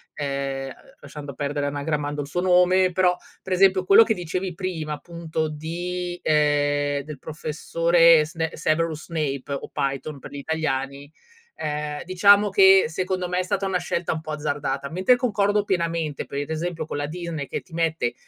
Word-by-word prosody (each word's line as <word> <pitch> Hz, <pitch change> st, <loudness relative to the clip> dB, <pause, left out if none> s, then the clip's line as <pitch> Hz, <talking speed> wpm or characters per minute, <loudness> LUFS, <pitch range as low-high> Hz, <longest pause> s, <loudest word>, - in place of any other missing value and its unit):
ehm, 140 Hz, -1 st, -3 dB
uhm, 135 Hz, -, -7 dB, 0.3 s
lasciando 145 Hz, -1 st, -9 dB
perdere 145 Hz, 0 st, -2 dB
anagrammando 145 Hz, 0 st, -2 dB
il 140 Hz, -, -6 dB
suo 175 Hz, +5 st, -2 dB
nome, 180 Hz, 0 st, +4 dB
però 180 Hz, 0 st, +3 dB, 0.3 s
per 190 Hz, -, -3 dB
esempio 185 Hz, 0 st, +4 dB
quello 195 Hz, +4 st, +7 dB
che 225 Hz, -, +1 dB
dicevi 180 Hz, +1 st, -3 dB
prima 170 Hz, -4 st, -3 dB
appunto 160 Hz, +1 st, -4 dB
di 175 Hz, +3 st, -4 dB
ehm, 145 Hz, -1 st, +2 dB
del 150 Hz, -1 st, -9 dB
professore 165 Hz, +2 st, +3 dB
Sne 160 Hz, +1 st, -3 dB
Severus 160 Hz, -1 st, -1 dB
Snape 145 Hz, -4 st, -3 dB
o 140 Hz, -, -5 dB
Piton 140 Hz, +1 st, -3 dB
per -, -, -11 dB
gli 145 Hz, -, -7 dB
italiani, 140 Hz, -2 st, -3 dB, 0.4 s
ehm, 150 Hz, 0 st, -4 dB
diciamo 200 Hz, +3 st, +5 dB
che 195 Hz, 0 st, +6 dB
secondo 185 Hz, +2 st, -2 dB
me 180 Hz, +1 st, -1 dB
è -, -, +1 dB
stata 195 Hz, +1 st, -1 dB
una 185 Hz, -2 st, 0 dB
scelta 170 Hz, -1 st, -2 dB
un 160 Hz, -, -5 dB
po' 155 Hz, -, -7 dB
azzardata. 145 Hz, -2 st, -3 dB
Mentre 185 Hz, +9 st, +4 dB
concordo 210 Hz, -4 st, +1 dB
pienamente 170 Hz, -6 st, -1 dB
per 140 Hz, -, -4 dB
ad 145 Hz, -, -6 dB
esempio 160 Hz, 0 st, -3 dB
con 150 Hz, -, -5 dB
la 145 Hz, 0 st, -2 dB
Disney 165 Hz, -3 st, -5 dB
che -, -, -4 dB
ti 175 Hz, -, -21 dB
mette 160 Hz, -7 st, 0 dB
160 Hz, 170 wpm, -24 LUFS, 145-180 Hz, 0.4 s, quello